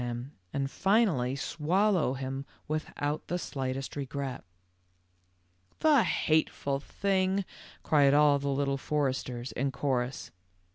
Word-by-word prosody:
91 120 -1 -2
him, 125 +4 -8 0.2
and 135 0 -2
finally 190 - +2
swallow 165 +1 +1
him 135 +1 -4 0.2
without 155 -1 -3
the 175 - -1
slightest 135 -4 -4
regret." 140 -2 -4 1.3
"The 300 -5 +5
hateful 155 -6 +1
thing," 190 +4 0 0.4
cried 145 -2 +4
all 145 -1 +5
the 140 - -3
Little 140 0 0
Foresters 130 -4 -2
in 135 +2 -1
chorus. 130 -2 -2
140 Hz, 110 wpm, -30 LUFS, 135-160 Hz, 1.3 s, The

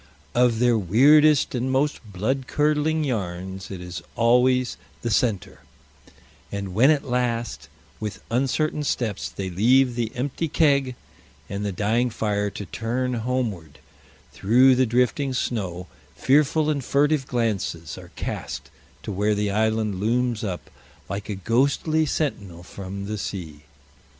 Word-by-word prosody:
Of 120 -2 +3
their 120 -1 +3
weirdest 145 - +5
and 125 +1 -1
most 145 +3 +1
blood 115 +6 -2
curdling 150 +1 +1
yarns 95 -6 -4
it 95 - -6
is 90 -2 -7
always 125 +2 +3 0.3
the 120 - -1
center; 105 -3 0 0.9
and 100 -2 -4
when 120 +8 +5
at 150 -3 +2
last, 115 - -2 0.3
with 105 -3 -5
uncertain 140 +5 0
steps, 115 -7 -2
they 95 -2 -5
leave 125 +7 +4
the 115 -2 -2
empty 140 +6 -2
keg 140 -5 +2 0.5
and 100 +1 -4
the 100 - -1
dying 110 +6 +1
fire 105 -2 -1
to 100 - -7
turn 120 +6 -2
homeward 115 - -3 0.5
through 125 +6 +5
the 130 0 +2
drifting 125 +3 +1
snow, 95 -8 -2 0.3
fearful 150 +2 +3
and 140 -3 -2
furtive 145 +1 +2
glances 105 - -2
are - - -11
cast 70 0 -5 0.3
to 105 - -5
where 105 +2 +1
the 105 0 0
island 110 -2 0
looms 115 +1 0
up 90 -7 -5 0.4
like 100 +2 -5
a 105 - -2
ghostly 140 - +1
sentinel 100 - -3
from 100 +1 -7
the 105 +1 -4
sea. 80 -7 -6
115 Hz, 135 wpm, -24 LUFS, 100-130 Hz, 0.9 s, weirdest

